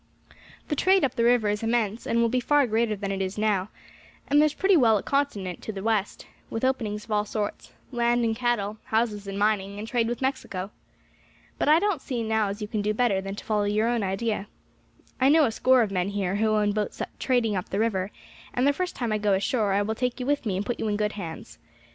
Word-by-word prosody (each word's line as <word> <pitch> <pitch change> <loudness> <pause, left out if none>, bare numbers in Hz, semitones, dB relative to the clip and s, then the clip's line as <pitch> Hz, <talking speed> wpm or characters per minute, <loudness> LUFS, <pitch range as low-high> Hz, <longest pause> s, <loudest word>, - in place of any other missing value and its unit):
The 300 - 0
trade 380 +6 +3
up 265 - +1
the 230 - 0
river 235 -2 +4
is 205 0 0
immense, 225 -1 -1
and 230 - +1
will 235 - +4
be 250 +2 +1
far 290 +3 +3
greater 225 -1 +1
than 200 -1 -4
it 195 0 -2
is 190 +1 -3
now; 210 -2 +1 0.6
and 290 +1 +4
there's 305 -1 +2
pretty 385 0 +3
well 230 -8 +5
a - - -4
continent 210 -11 -1
to - - -5
the 195 -2 -7
west, 215 -2 -1 0.2
with 225 +3 -2
openings 215 -5 -1
of 220 - -12
all 210 0 +2
sorts, 210 0 -4 0.2
land 240 -1 +2
and 225 -1 0
cattle, 220 -4 -1
houses 220 -2 -1
and 195 0 -4
mining, 200 -1 0
and 215 +2 -6
trade 230 -1 +1
with 240 0 -3
Mexico. 210 -8 -3 0.9
But - - +2
I 310 - +7
don't 385 -5 0
see 235 -4 -3
as 210 -1 0
you - - -4
can 215 -1 -2
do 210 +1 -1
better 215 -5 +2
than 195 +1 -5
to - - -9
follow 215 -1 +1
out 205 - 0
your 215 +2 +2
own 240 -1 0
idea. 200 +1 -2 0.7
"I 265 +1 +4
know 310 +1 +6
a 230 - 0
score 255 +2 +4
of 210 - -3
men 185 0 0
here 200 -1 -1
who 220 +1 +2
own 210 -1 +2
boats 210 0 -3 0.2
trading 240 -5 +1
up 185 - -3
the 195 - -2
river, 200 -4 0 0.5
and 250 - +2
the 285 - +4
first 365 +4 -3
time 240 -3 -2
I 215 - 0
go 205 -1 +2
ashore 200 +2 +1
I 200 +1 +2
will 220 +2 -1
take 250 +2 -2
you 250 - -3
with 285 -3 0
me 190 -3 0
and 200 - -2
put 240 - -3
you 220 - -1
in 205 -1 0
good 210 0 0
hands. 170 -6 -8
220 Hz, 245 wpm, -26 LUFS, 205-245 Hz, 0.9 s, I